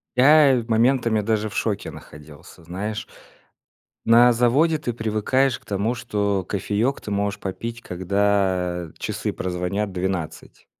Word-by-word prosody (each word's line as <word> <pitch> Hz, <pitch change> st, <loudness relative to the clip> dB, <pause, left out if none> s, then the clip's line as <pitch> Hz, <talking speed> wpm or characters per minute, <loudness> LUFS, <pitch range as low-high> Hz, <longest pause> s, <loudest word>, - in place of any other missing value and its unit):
Я, 140 Hz, +1 st, +6 dB
в 115 Hz, -, -13 dB
моментами, 115 Hz, -1 st, +2 dB
даже 110 Hz, 0 st, -1 dB
в -, -, -12 dB
шоке 105 Hz, -3 st, -2 dB
находился, 75 Hz, +2 st, -14 dB
знаешь. 100 Hz, +6 st, -5 dB, 1.0 s
На 120 Hz, +2 st, +6 dB
заводе 135 Hz, +8 st, +3 dB
ты 125 Hz, -5 st, -4 dB
привыкаешь 115 Hz, +4 st, 0 dB
к -, -, -29 dB
тому, 105 Hz, +4 st, -1 dB
что 100 Hz, -5 st, -1 dB
кофеёк 105 Hz, +6 st, -1 dB
ты 105 Hz, -, -7 dB
можешь 100 Hz, 0 st, -1 dB
попить, 115 Hz, +5 st, -5 dB
когда 95 Hz, -2 st, 0 dB
часы -, -, -3 dB
прозвонят 95 Hz, +3 st, -3 dB
12. 90 Hz, -3 st, -5 dB
105 Hz, 130 wpm, -23 LUFS, 95-120 Hz, 1.0 s, Я